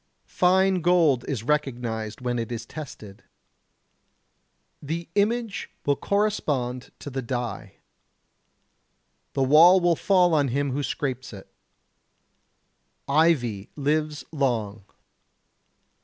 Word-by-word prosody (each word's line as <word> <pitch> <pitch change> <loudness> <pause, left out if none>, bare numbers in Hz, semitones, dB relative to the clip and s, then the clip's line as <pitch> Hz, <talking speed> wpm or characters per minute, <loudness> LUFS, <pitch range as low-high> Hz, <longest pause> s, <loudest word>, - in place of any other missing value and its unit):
Fine 185 0 +2
gold 165 -7 +3
is 125 -6 -3
recognized 120 -6 -2
when 125 -1 -1
it 115 0 -4
is 120 -1 -5
tested. 110 -10 -10 1.6
The 165 +4 -4
image 220 +1 -1 0.2
will 145 - +2
correspond 145 -12 -1
to 145 - -8
the 135 +1 -3
die. 120 -1 -5 1.6
The 135 - +1
wall 165 +7 +7
will 175 -1 +2
fall 180 -1 +3
on 145 -3 +3
him 140 +2 -1
who 140 +3 -2
scrapes 130 -3 -4
it. 95 - -12 1.5
Ivy 140 -9 +2
lives 150 +1 -1
long. 115 -9 -2
140 Hz, 100 wpm, -25 LUFS, 120-170 Hz, 1.6 s, wall